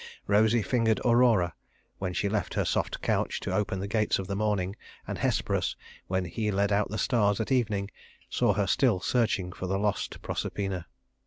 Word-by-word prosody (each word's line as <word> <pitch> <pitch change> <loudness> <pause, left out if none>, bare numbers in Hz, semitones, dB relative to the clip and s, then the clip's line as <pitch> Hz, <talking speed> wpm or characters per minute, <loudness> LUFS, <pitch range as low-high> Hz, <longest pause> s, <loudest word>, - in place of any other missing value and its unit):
Rosy 110 +2 +3
fingered 110 +1 +2
Aurora, 115 -7 +4 0.5
when 95 -1 -2
she 100 - 0
left 105 0 -2
her - - +1
soft - - -1
couch - - 0
to - - -3
open 95 -2 0
the 100 - -3
gates 110 +1 +1
of 95 - -4
the 100 - -3
morning, 100 -2 0 0.3
and - - -4
Hesperus, - - 0 0.3
when 95 0 0
he 105 +5 -2
led 100 0 +1
out 100 +1 +2
the 105 - -3
stars 105 -4 +2
at 110 - -2
evening, 105 -6 +1 0.4
saw - - +2
her - - +1
still 95 - +3
searching 110 -3 0
for 95 - -5
the 95 +1 0
lost 105 0 -1
Proserpina. 95 -4 -3
100 Hz, 180 wpm, -28 LUFS, 95-110 Hz, 0.5 s, Aurora